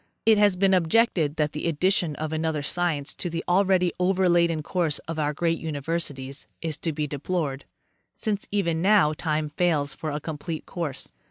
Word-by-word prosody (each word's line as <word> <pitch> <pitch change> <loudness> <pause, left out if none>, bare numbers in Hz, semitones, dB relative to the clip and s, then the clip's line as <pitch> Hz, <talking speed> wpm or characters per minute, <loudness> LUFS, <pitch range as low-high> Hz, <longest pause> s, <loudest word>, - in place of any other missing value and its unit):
It 220 -2 +5
has 205 -2 +5
been 190 +1 +3
objected 170 -3 +2
that 150 -2 0
the 150 - -3
addition 170 0 +1
of 155 +1 -4
another 160 -2 -1
science 160 -3 -1
to 175 - -4
the 165 0 -3
already 185 -1 +3
overladen 175 -3 +2
course 165 -3 0
of 165 -1 -4
our 150 -1 +1
great 165 +2 0
universities 145 -3 -4
is 160 -2 -3
to 165 - -1
be 150 0 -2
deplored, 145 -1 -3 0.5
since 205 -2 -2
even 170 -5 0
now 190 -5 +5
time 155 -1 -1
fails 150 -3 +1
for 155 +3 -5
a 150 0 -2
complete 155 +1 -5
course. 160 -7 -5
165 Hz, 170 wpm, -25 LUFS, 150-180 Hz, 0.5 s, It